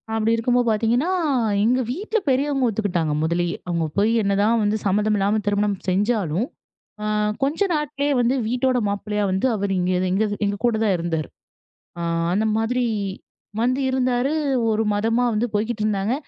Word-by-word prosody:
அப்டி 225 0 +1
இருக்கும்போது 245 +1 +1
பாத்தீங்கன்னா, 230 +8 +1 0.5
எங்க 245 +4 +3
வீட்ல 425 - -1
பெரியவங்க 270 -1 +1
ஒத்துக்கிட்டாங்க, 180 -8 -1
முதலயே. 170 +1 0
அவுங்க 170 -2 0
போயி 210 +3 +3
என்னதான் 205 +3 +2
வந்து 210 +1 +1
சம்மதம் 210 +2 +2
இல்லாம 205 +2 +1
திருமணம் 205 -1 +1
செஞ்சாலும், 200 - 0 0.5
அ, - - -3 0.4
கொஞ்ச 285 +4 0 0.2
நாட்கள்லே 290 -1 -1
வந்து 245 +3 +2
வீட்டோட 250 +2 +1
மாப்பிள்ளையா 210 +1 -2
வந்து, 190 +6 0
அவர் 200 -1 -1
இங்க, 180 +1 0 0.2
எங்க 195 +4 +2 0.2
எங்க 200 0 -1
கூட 235 -2 +2
தான் 205 -4 +2
இருந்தாரு. 165 -2 -2 0.7
அ, - - -4 0.3
அந்த 210 +3 +1
மாதிரி 245 +3 0 0.8
வந்து 255 +3 +1
இருந்தாரு. 255 +1 +1 0.4
1 215 +1 +1
மதமா 225 +4 +1
வந்து 215 +3 +1
போய்க்கிட்டு 215 +1 -1
இருந்தாங்க. 210 +2 0
215 Hz, 145 wpm, -22 LUFS, 200-245 Hz, 0.8 s, எங்க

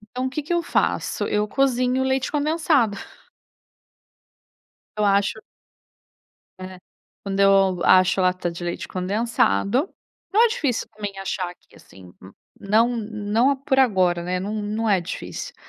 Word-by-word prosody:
Então 255 +1 -1
o - - -3
que 300 +3 -4
que 300 - -4
eu 345 0 +1
faço? - - -1
Eu 210 0 0
cozinho 255 0 +1
o - - 0
leite 265 0 0
condensado. 295 -7 +1 2.0
Eu 210 - 0
acho 200 +1 +1 1.2
É. 185 0 -9 0.4
Quando 195 -1 -3
eu 195 -2 +4
acho 185 +1 +4
lata 180 -1 0
de 170 +1 -7
leite 175 - -4
condensado 205 - 0 0.4
Não 440 +4 +5
é - - +4
difícil, 265 - -2
também, 205 -2 -7
achar 190 -1 -3
aqui, 180 - -20
assim. 90 -1 -16 0.5
Não 215 +4 +3
não 220 +4 0
por 270 0 -1
agora, 185 -9 +2
né? 180 +1 -2
Não 205 +3 -4
não 215 +2 -2
é 195 -2 +3
difícil. 175 +1 -7
210 Hz, 140 wpm, -22 LUFS, 185-260 Hz, 2.0 s, Não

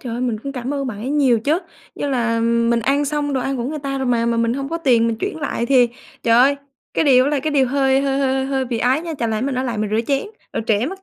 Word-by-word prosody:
trời 240 -3 -6
ơi 240 - -3
mình 240 -4 -1
cũng 275 +2 -5
cảm 260 +1 -4
ơn 275 -1 -2
bạn 220 -5 -5
ấy 250 +5 -4
nhiều 265 -6 +3
chứ. 300 +7 +1 0.4
Như 285 - -3
là 235 -4 0
mình 235 0 +2
ăn 275 +5 +1
xong 290 0 -1
đồ 265 - 0
ăn 270 +1 -2
của 235 - -3
người 300 +4 -3
ta 275 -1 -3
rồi 265 - -2
mà, 235 -1 +1
mà 235 0 +1
mình 230 0 +1
hông 275 +1 -4
có 335 - -3
tiền 240 -7 +3
mình 230 - -2
chuyển 395 +2 -3
lại 235 -4 -2
thì 250 -2 +4 0.3
trời 230 -1 +3
ơi, 275 +3 +5 0.4
cái - - +2
điều 255 -3 +5
đó 285 - 0
là 290 -2 0
cái 310 - -2
điều 275 -3 +3
hơi 270 0 +2
hơi 275 0 0
hơi 265 -1 0
hơi 270 -1 -1
bị 240 -2 -3
ái 255 +5 +2
nha. 335 -2 -5
Chẳng 230 -1 -1
lẽ 220 0 -1
mình 270 +1 -1
ở 255 - -1
lại 235 -4 -3
mình 210 -1 -2
rửa 220 - +2
chén, 275 +4 0 0.3
rồi - - -2
trễ 220 +2 +2
mất 385 +4 -7
260 Hz, 310 wpm, -20 LUFS, 235-280 Hz, 0.4 s, ơi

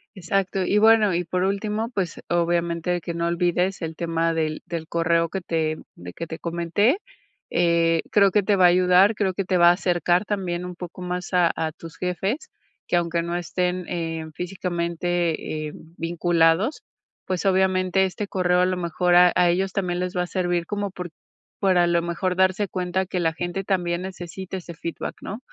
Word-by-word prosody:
Exacto. 190 +1 -1
Y 195 +3 +1
bueno, 215 -3 +5
y 175 - 0
por 180 +2 -2
último, 210 +3 -1
pues, 190 -8 -3
obviamente 170 0 0
que 170 +1 -5
no 170 0 -1
olvides 175 +2 0
el 160 -1 -4
tema 165 0 0
del 155 -1 -1
del 165 -2 -5
correo 170 0 +1
que 190 - -4
te 160 -2 -1 0.2
de 90 0 -10
que 170 - -6
te 160 0 -6
comenté, 170 - +1 0.5
eh, 165 -1 +2
creo 200 -1 +5
que 210 +1 +3
te 205 +1 +2
va 185 -2 +5
a - - +9
ayudar, 180 +4 +5
creo 195 -3 0
que 195 - -2
te 185 0 +1
va 175 0 +7
a - - +8
acercar 175 0 +1
también 180 -4 -2
un 180 0 -7
poco 180 +1 -9
más 180 +1 -4
a 175 -2 +4
a 160 -1 -2
tus 165 +1 -12
jefes 190 - -2 0.4
que, - - +1
aunque 170 -1 +1
no 170 +1 -3
estén, 180 +1 -2
eh, 165 -2 -3
físicamente, 170 -3 -2
eh, - - -7 0.3
vinculados, 170 - +1 0.4
pues, 185 -2 -2
obviamente 190 0 +2
este 190 +2 -4
correo, 180 -2 +1
a - - +4
lo 185 0 -1
mejor, 175 +1 +1
a 180 0 +7
a 175 -1 +4
ellos 190 +2 +1
también 180 -2 -1
les 180 0 -3
va 180 - +1
a - - -5
servir 175 -2 -1
como 205 -1 -3
por 180 -1 -6 0.5
para, 185 -3 +3
a 175 - +3
lo 170 0 +2
mejor, 180 +2 -1
darse 190 +2 +2
cuenta 185 +1 -2
que 180 - -2
la 165 -1 +1
gente 175 +3 -3
también 175 -3 -1
necesita 185 0 -6
ese 175 -2 -8
feedback, 165 0 -5
¿no? 205 +4 -6
180 Hz, 195 wpm, -24 LUFS, 170-190 Hz, 0.5 s, a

